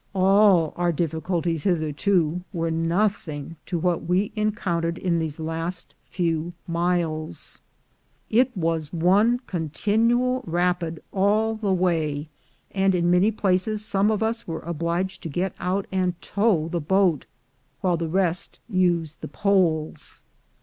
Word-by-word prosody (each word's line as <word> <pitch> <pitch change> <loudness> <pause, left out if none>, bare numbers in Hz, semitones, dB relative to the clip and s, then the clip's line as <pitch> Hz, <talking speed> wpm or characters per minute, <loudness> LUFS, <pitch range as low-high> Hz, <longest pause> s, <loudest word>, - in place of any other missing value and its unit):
All 190 -3 +4
our 175 0 +2
difficulties 165 0 -1
hitherto 170 0 +1
were 165 -3 -1
nothing 165 -2 -1
to 175 - -1
what 175 0 0
we 185 +4 +1
en 215 0 +1
countered 170 -4 -2
in 170 -2 0
these 160 -1 -4
last 165 +2 -4 0.2
few 170 -1 -1
miles. 170 -2 -2 0.7
I». 250 +3 +5
was 165 -4 -1
one 200 +8 +3
con 165 -4 -3
tinual 235 - +2
rapid 175 -1 -1
all 210 +3 +2
the 215 -3 -1
way, 160 -5 0 0.4
and 195 -1 +2
in 175 0 +2
many 180 +4 +4
places 210 +1 0
some 200 +1 +2
of 220 0 +1
us 225 +1 -2
were 165 -1 -4
obliged 170 +3 -2
to 165 - -5
get 180 +5 -2
out 190 +2 -1
and 185 -2 0
tow 200 -7 +1
the 170 0 -2
boat, 180 -2 +2 0.5
while 180 -3 +2
the 165 -1 -3
rest 180 -1 -1
used 175 -6 0
the - - -5
poles. 165 -7 0
175 Hz, 135 wpm, -24 LUFS, 165-195 Hz, 0.7 s, I